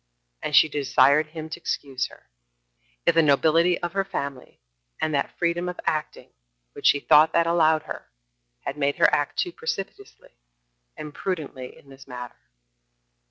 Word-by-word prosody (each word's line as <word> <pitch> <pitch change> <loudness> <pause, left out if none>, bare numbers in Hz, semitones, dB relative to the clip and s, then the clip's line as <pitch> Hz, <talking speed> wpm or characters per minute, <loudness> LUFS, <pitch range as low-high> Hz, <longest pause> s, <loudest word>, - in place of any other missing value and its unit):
And 150 - -2
she 155 - +7
desired 145 0 +3
him 155 0 -8
to 160 - -7
excuse 135 -5 -3
her, - - -18 0.8
if - - +4
the 165 - +5
nobility 160 +4 +3
of 175 -1 -3
her 195 0 +1
family, 140 -8 -6 0.4
and 155 -1 -1
that 140 - -2
freedom 175 +1 -1
of 180 - -7
acting 155 -1 -3 0.4
which - - -1
she 145 - +5
thought 155 +2 +5
that 170 - +3
allowed 160 -2 +3
her, - - -9 0.5
had 140 - -6
made 140 0 +1
her - - +4
act 145 - 0
too 355 - 0
precipitately 415 - -7 0.6
and 150 - -7
imprudently 145 -6 -5
in 140 - -20
this 135 0 -15
matter. 125 -2 -8
155 Hz, 160 wpm, -24 LUFS, 140-170 Hz, 0.8 s, she